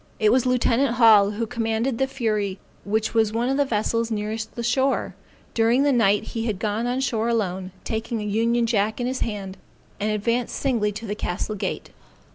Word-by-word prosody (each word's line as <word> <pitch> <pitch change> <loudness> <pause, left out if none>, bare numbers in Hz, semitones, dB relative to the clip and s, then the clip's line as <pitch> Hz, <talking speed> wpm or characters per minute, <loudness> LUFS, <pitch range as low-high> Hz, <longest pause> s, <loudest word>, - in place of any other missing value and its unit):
It 215 -1 +3
was 255 +1 +3
lieutenant 250 0 +2
Hall, 220 -4 +6
who 215 +3 -2
commanded 230 +1 -1
the 265 - +2
Fury 215 -7 -1 0.3
which 220 +2 -1
was 220 -2 +3
one 235 +3 0
of 270 - +1
the 285 - +3
vessels 230 -1 0
nearest 215 0 -4
the 235 - -4
shore. 260 +3 +1 0.4
During 230 +4 +3
the 285 - +3
night 210 -5 +3
he 225 0 -2
had 210 -4 -1
gone 215 +3 -1
on 250 +2 -1
shore 230 -3 0
alone, 190 -5 -1
taking 225 +1 -3
an 210 - -4
union 230 +2 +2
jack 220 -1 0
in 245 - -1
his 255 +1 -2
hand, 200 -3 -4 0.4
and 210 - 0
advanced 230 +3 -1
singly 230 -6 0
to 215 +3 -7
the 205 - -3
castle 210 0 -3
gate. 205 - -4
225 Hz, 195 wpm, -24 LUFS, 210-240 Hz, 0.4 s, Hall